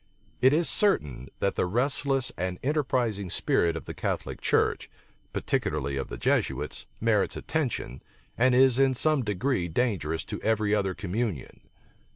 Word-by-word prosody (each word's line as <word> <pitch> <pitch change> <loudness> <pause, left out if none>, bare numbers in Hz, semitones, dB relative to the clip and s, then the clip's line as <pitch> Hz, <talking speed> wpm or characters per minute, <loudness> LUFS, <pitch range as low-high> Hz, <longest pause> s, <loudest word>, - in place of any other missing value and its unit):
It 130 - +6
is 160 +3 +3
certain, 70 - +2
that - - +1
the - - 0
restless 135 +4 0
and 90 0 -3
enterprising 125 - 0
spirit 85 -1 +1
of 80 - -6
the - - -6
Catholic - - -3
church, - - +1 0.4
particularly 70 -3 -1
of 70 -1 -3
the - - -7
Jesuits, 70 +3 -1
merits 110 -3 +1
attention, 125 - -3 0.3
and 125 +1 +3
is 130 0 +5
in 135 -1 +4
some 155 +2 +2
degree 105 -1 -1
dangerous 80 -5 -1
to - - -6
every 110 -2 +1
other 95 -3 0
communion. 100 - -4
110 Hz, 145 wpm, -27 LUFS, 85-130 Hz, 0.4 s, It